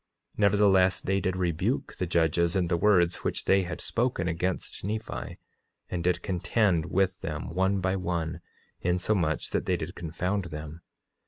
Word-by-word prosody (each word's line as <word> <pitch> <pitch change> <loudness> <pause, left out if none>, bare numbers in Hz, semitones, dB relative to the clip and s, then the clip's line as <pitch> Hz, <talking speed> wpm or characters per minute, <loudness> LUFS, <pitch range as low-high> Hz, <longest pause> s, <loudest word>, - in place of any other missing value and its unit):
Nevertheless, 100 -2 +4
they 95 +1 0
did 95 -1 -1
rebuke 90 - -1
the 90 - -1
judges 85 +1 +2
in 90 -3 +1
the 85 - +2
words 90 -1 +3
which - - -3
they 95 0 +4
had 90 -2 -5
spoken 115 -7 -1
against 90 +2 -2
Nephi, 105 - -4 0.5
and 85 -2 -2
did 90 0 +1
contend 95 -2 +1
with 95 -1 +1
them 75 0 -4
one 95 +2 +1
by 95 +1 +1
one, 85 -3 -2 0.4
insomuch 90 -2 0
that - - -1
they - - +2
did - - -5
confound 90 +4 -2
them. 80 0 -7
90 Hz, 155 wpm, -28 LUFS, 85-95 Hz, 0.5 s, Nevertheless